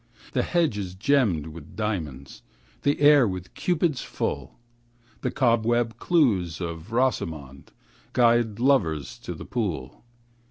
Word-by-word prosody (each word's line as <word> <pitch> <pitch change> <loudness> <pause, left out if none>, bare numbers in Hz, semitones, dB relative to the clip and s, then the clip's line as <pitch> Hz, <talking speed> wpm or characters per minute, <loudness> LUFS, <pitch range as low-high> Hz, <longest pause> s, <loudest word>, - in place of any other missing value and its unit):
The - - +2
hedge 165 - +1
is 90 -2 -5
gemmed 105 - +2
with 80 -1 -11
diamonds, 80 - -4 0.4
The 145 0 +1
air 145 -4 +7
with 95 -1 -6
Cupids 165 -6 0
full, - - -4 0.6
The - - 0
cobweb 120 -1 +1
clues 105 - +2
of 85 +2 -6
Rosamond 80 - -2 0.4
Guide 120 -3 +3
lovers 85 - +1
to - - -6
the - - -9
pool. 85 - -4
110 Hz, 120 wpm, -25 LUFS, 85-130 Hz, 0.6 s, air